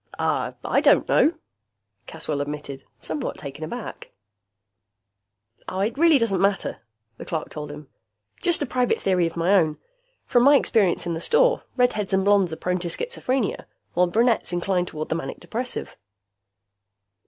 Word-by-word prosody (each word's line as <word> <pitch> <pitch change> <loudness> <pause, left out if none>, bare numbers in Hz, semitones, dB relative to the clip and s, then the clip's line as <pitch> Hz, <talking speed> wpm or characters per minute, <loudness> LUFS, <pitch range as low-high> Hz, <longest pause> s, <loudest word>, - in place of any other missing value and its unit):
"I - - 0
don't - - +4
know," 320 - +4 0.7
Caswell 145 -2 -3
admitted, 145 -2 -6
somewhat 155 -2 -4
taken 140 +2 -8
aback. 240 +9 -7 1.6
"It 200 +5 -1
really 330 0 +5
doesn't 210 -7 +1
matter," 195 0 0 0.4
the - - -8
clerk 160 -2 -3
told 150 -1 -7
him. 150 -1 -10 0.5
"Just 345 -4 +2
a - - -1
private 250 -1 0
theory 180 -3 +2
of 165 - -8
my 170 +4 +2
own. 160 -6 +3 0.5
From 245 - +3
my 280 +4 +7
experience 205 -11 +2
in 170 - -2
the 165 - -4
store, - - +3
redheads 215 -6 +1
and 190 0 +2
blonds 200 -4 +4
are - - -3
prone 180 0 -1
to 175 - -3
schizophrenia, 260 - -2 0.3
while 180 +1 +3
brunettes 230 +5 +2
incline 180 0 0
toward 155 -1 -6
the - - +1
manic 165 - -5
depressive." 245 +2 -4
190 Hz, 150 wpm, -24 LUFS, 165-245 Hz, 1.6 s, my